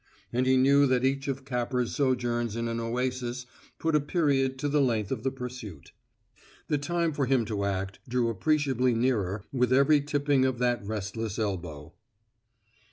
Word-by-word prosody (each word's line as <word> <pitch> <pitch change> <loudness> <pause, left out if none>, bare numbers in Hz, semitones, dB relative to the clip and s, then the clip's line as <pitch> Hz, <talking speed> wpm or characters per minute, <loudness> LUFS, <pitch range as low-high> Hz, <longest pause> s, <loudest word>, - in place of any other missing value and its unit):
And 125 +2 +1
he 130 0 +4
knew 140 +2 +5
that 130 0 +2
each 135 +1 0
of 135 -1 -3
Capper's 125 -2 -1
sojourns 120 -4 0
in 115 0 -2
an 115 0 -2
oasis 125 +1 -2 0.3
put 160 -1 -1
a - - +5
period 140 -4 +1
to 145 - -2
the 145 0 +2
length 115 -6 0
of 130 -5 -2
the 135 - 0
pursuit. 125 - -8 0.8
The 150 - +1
time 170 +2 -1
for 140 -2 -1
him 130 -3 +2
to 105 -2 -2
act 95 -1 -3
drew 125 -1 +1
appreciably 130 +1 +1
nearer 110 -5 0
with 125 -1 +1
every 140 +3 +5
tipping 145 -1 +1
of 130 -1 +1
that 120 -2 0
restless 105 +1 -4
elbow. 85 -8 -4
125 Hz, 165 wpm, -28 LUFS, 115-135 Hz, 0.8 s, knew